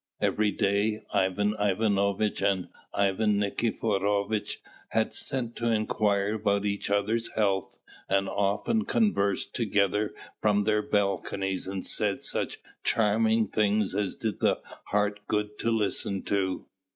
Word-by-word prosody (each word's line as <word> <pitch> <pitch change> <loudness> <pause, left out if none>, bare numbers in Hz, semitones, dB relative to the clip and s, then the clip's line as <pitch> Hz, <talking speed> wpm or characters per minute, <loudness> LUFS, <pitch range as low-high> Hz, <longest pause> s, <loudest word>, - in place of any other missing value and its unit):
Every 105 0 +2
day 100 +2 +1
Ivan 105 +2 +2
Ivanovitch 100 0 +1
and 95 -2 +1 0.2
Ivan 100 +1 +2
Nikiforovitch 100 0 0 0.3
had 110 0 0
sent 120 -3 -3
to 115 -1 +1
inquire 105 -2 +1
about 100 -2 +1
each 100 -1 -1
other's 105 +3 +1
health, 100 -3 0 0.3
and 95 0 +2
often 105 - 0
conversed 100 - +1
together 105 -2 +1 0.3
from 105 -1 +3
their 105 0 +2
balconies 100 -2 -1
and 95 -1 -4
said - - 0
such - - -1 0.3
charming 110 0 +3
things 105 -1 +1
as 105 -2 -1
did 110 -2 -3
the - - +2 0.3
heart 105 0 0
good 105 0 -1
to 115 - 0
listen 100 -3 0
to. 95 -2 -1
105 Hz, 125 wpm, -28 LUFS, 100-110 Hz, 0.3 s, from